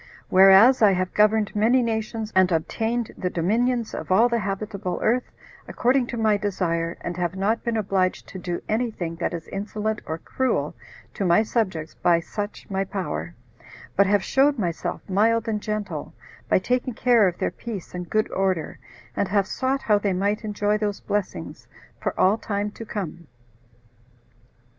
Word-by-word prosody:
Whereas 195 +7 +7
I 205 -3 +6
have 185 0 -1
governed 215 0 +3
many 235 +5 +3
nations, 220 -1 -3
and 185 -1 +4
obtained 225 +8 -1
the 180 - -2
dominions 230 +7 0
of - - -5
all 225 +6 +5
the 235 -1 +1
habitable 200 -2 -3
earth, 245 +3 +2 0.4
according 250 0 +1
to 240 - -5
my 215 -2 +3
desire, 175 -4 -1
and 175 - -4
have 175 0 -1
not 200 +4 0
been 235 -1 -1
obliged 190 -3 0
to 190 - -8
do 175 -1 -4
any 230 +3 0
thing 170 -6 -5
that 170 - -1
is 165 -2 -6
insolent 210 +2 -3
or 160 - -3
cruel 260 +9 -1 0.4
to - - -3
my 180 +3 +4
subjects 190 -9 -2
by 170 -1 +2
such 205 +4 -6
my 195 -1 -1
power, 85 - -4 0.6
but 200 0 +4
have 205 -1 +2
showed 280 +1 +3
myself 175 -6 -3
mild 225 +4 +2
and 215 -2 -1
gentle, 205 -8 -4 0.3
by - - +5
taking 250 +5 -1
care 235 -5 +4
of 175 - -2
their - - -1
peace 220 -7 -7
and 180 -1 -6
good 215 0 +1
order, 190 -5 -1 0.4
and 200 - 0
have 200 +1 +2
sought 265 +6 -1
how 210 -2 +3
they 200 -2 0
might 200 +4 0
enjoy 210 0 0
those 205 -2 -2
blessings 185 - -4 0.3
for - - -3
all 200 +4 +4
time 205 0 -2
to 225 - -9
come. 175 -7 -6
205 Hz, 170 wpm, -24 LUFS, 185-225 Hz, 0.6 s, Whereas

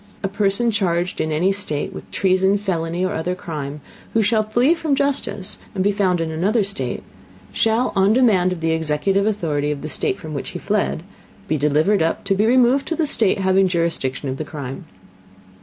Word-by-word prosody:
A - - +1
Person 200 +4 +1
charged 180 -4 0
in 155 - -1
any 170 +5 +2
State 190 -7 -2
with - - -9
Treason, 190 +1 +2
Felony, 175 -3 -2
or 185 - -1
other 175 +3 -2
Crime, 150 -5 -6 0.3
who 225 - +4
shall 215 +1 +3
flee 240 +8 +2
from 320 -4 0
Justice, 260 -8 -1 0.2
and 190 - 0
be 205 - +3
found 190 -4 +1
in 165 -1 -2
another 200 +8 +1
State, 200 +2 -3 0.5
shall 225 +3 +1
on 195 +1 +4
Demand 210 -8 +3
of 180 -3 -4
the 165 0 +1
executive 160 +6 +1
Authority 155 -9 -1
of 150 -1 -3
the - - -3
State 195 - -1
from 160 -5 -8
which 140 - -4
he 175 - -6
fled, 200 -3 -1 0.4
be 155 - 0
delivered 155 +7 +2
up, 165 - 0
to 195 - +1
be 205 +3 +2
removed 255 +3 +3
to 330 - -1
the 320 - +1
State 220 -8 +2
having 190 0 +3
Jurisdiction 165 -6 -1
of 130 0 -3
the 155 - -3
Crime. 135 -3 -6
190 Hz, 195 wpm, -21 LUFS, 160-210 Hz, 0.5 s, who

